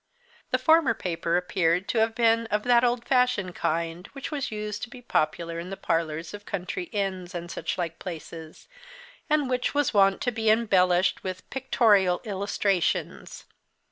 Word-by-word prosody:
This 255 0 -1
former 315 -6 +5
paper 170 -3 -1
appeared 180 0 +1
to 230 - +1
have 225 0 +1
been 230 -1 +3
of 210 -1 -1
that 245 -1 +4
old 240 -1 +1
fashioned 250 -8 +1
kind 165 +4 -2
which 275 +2 -6 0.2
used 210 -1 -4
to 245 - -5
be 250 - -11
popular 170 -6 -1
in 175 +2 -7
the 195 - -6
parlours 165 -2 -2
of 205 0 -8
country 185 -2 -4
inns, 190 -2 -3
and 175 0 -5
such - - -3
like 170 -2 -3
places, 165 -2 -9 0.6
and 300 -2 +2
which 250 +2 -1
was 290 -2 +1
wont 195 -1 +4
to 245 - 0
be 220 -1 0
embellished 185 -5 +3
with 185 -1 -6
"pictorial 210 -8 +3
illustrations." 200 -3 -1
195 Hz, 160 wpm, -26 LUFS, 175-235 Hz, 0.6 s, former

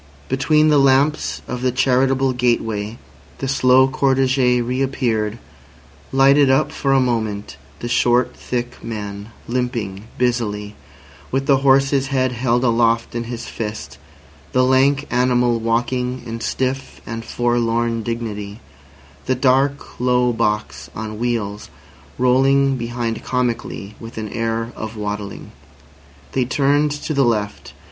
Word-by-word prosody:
Between 150 +4 +3
the 150 -2 +5
lamps 140 +3 +2
of 125 -1 -4
the 130 0 +1
charitable 130 +1 +2
gateway 115 -3 -1 0.4
the 135 - -3
slow 130 0 +4
cortege 130 -2 +2
reappeared, 120 -3 -1 0.7
lighted 135 +1 +5
up 135 +3 +3
for 135 - -1
a 135 - +5
moment, 110 - -1 0.3
the 120 - -3
short, 120 +1 +2
thick 120 0 -5
man 105 -2 -6 0.2
limping 115 -5 -3
busily, 105 -4 -1 0.5
with 135 +1 -1
the 135 -1 +4
horse's 135 0 +3
head 130 -2 +1
held 120 0 0
aloft 115 -1 +2
in 120 0 -3
his 120 0 -6
fist, 105 - -6 0.5
the 130 - +4
lank 135 +2 +3
animal 125 -1 +2
walking 125 +2 -1
in 115 -1 -6
stiff 130 +3 -2
and 115 0 -5
forlorn 120 -1 0
dignity, 110 -2 -5 0.7
the 130 - +2
dark, 135 +2 +1
low 125 0 +2
box 105 -2 -2
on 110 -1 -5
wheels 110 -4 -2 0.5
rolling 135 +2 +3
behind 120 -2 -3
comically 120 -5 -2
with 115 0 -10
an 110 -1 -4
air 115 +1 -2
of 110 0 -6
waddling. 105 -1 -5 0.8
They 130 -2 0
turned 145 +3 +2
to 145 +2 -4
the 140 -1 +3
left. 105 -4 -1
125 Hz, 125 wpm, -20 LUFS, 115-130 Hz, 0.8 s, the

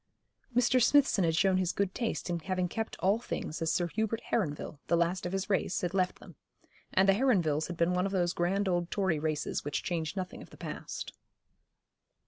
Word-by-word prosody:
Mr. 250 +1 +4
Smithson 270 -6 +4
had 165 -1 +2
shown 190 +2 +3
his 185 -1 +1
good 200 -1 -1
taste 230 -2 -2
in 175 -1 -1
having 185 +1 -1
kept 220 +5 -4
all 200 +4 +3
things 165 -9 -5
as 165 0 +1
Sir 175 - +1
Hubert 220 +3 -1
Heronville, 155 -7 -1
the 170 - +3
last 175 +2 0
of - - -5
his 195 0 -2
race, 195 -2 0
had 175 0 -2
left 185 -1 +1
them; - - -14 0.5
and 190 +1 +4
the 195 - +7
Heronvilles 180 - +2
had 175 - -6
been 170 +2 +2
one 180 +2 +1
of - - -5
those 175 -2 +1
grand 190 +3 0
old 175 -2 0
Tory 190 -6 +1
races 155 -1 -2
which 145 -1 -2
change 165 0 -2
nothing 185 -2 -5
of - - -12
the - - -15
past. - - -6
185 Hz, 205 wpm, -31 LUFS, 170-200 Hz, 0.5 s, the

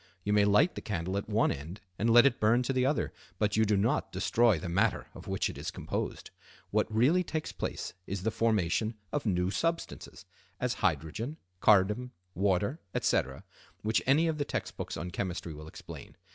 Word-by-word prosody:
You 105 - 0
may 105 -1 +5
light 105 - +4
the - - -6
candle 95 -2 -3
at 100 +1 -3
one 110 +2 +3
end 80 +9 -6 0.2
and 115 - +2
let 120 +2 +8
it 135 -3 +3
burn 115 +4 +4
to 135 - -1
the 130 0 +2
other, 145 - 0 0.2
but 105 -1 +1
you 110 0 +4
do 105 -1 +2
not 115 +10 +1
destroy 105 +2 +3
the 90 +3 -5
matter 85 +3 +1
of - - -11
which - - 0
it - - -7
is - - -3
composed. - - -4 0.4
What - - +1
really 135 +12 +4
takes 155 -2 -3
place - - -4
is 95 -1 -4
the 110 - +1
formation 110 -1 +1 0.2
of 145 -5 -2
new 90 -1 +1
substances, 165 - -3 0.3
as 125 -1 0
hydrogen, 105 - -1 0.2
carbon, 105 +6 +4 0.2
water, 100 - +1 0.2
etc., 65 +1 0 0.4
which 110 +1 +2
any 145 +5 +5
of 160 -2 -1
the - - +2
text - - -4
books - - -5
on 90 +1 -5
chemistry 90 -3 -3
will 75 +1 -10
explain. - - -10
105 Hz, 190 wpm, -30 LUFS, 95-125 Hz, 0.4 s, let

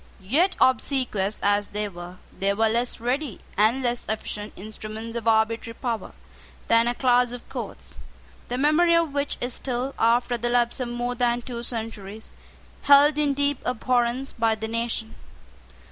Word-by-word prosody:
Yet, 290 - +2
obsequious 250 -6 +1
as 205 0 +2
they 210 0 -3
were, 175 -1 -9 0.2
they 200 +1 +1
were 220 +1 +3
less 240 +2 -1
ready 250 0 -2 0.2
and 225 +6 +3
less 240 -1 -1
efficient 210 -1 -4
instruments 215 +3 -8
of 230 -1 -4
arbitrary 225 +1 +1
power 230 - -4 0.5
than 230 +1 +4
a 240 - 0
class 245 -1 +3
of 245 - -9
courts, - - -7 0.5
the 245 - -3
memory 310 +5 +4
of 335 -4 +1
which 285 0 -1
is 245 0 -1
still, 255 +1 -3
after 240 +1 +2
the 240 +1 -1
lapse 240 0 +2
of 250 - -2
more 240 +1 -2
than 240 -1 0
two 235 -1 -5
centuries, 220 -3 -5 0.5
held 285 +1 +6
in 290 -2 +1
deep 285 -1 0
abhorrence 250 +1 0
by 225 -2 +1
the 220 0 -5
nation. 230 0 -3
240 Hz, 160 wpm, -25 LUFS, 220-255 Hz, 0.5 s, held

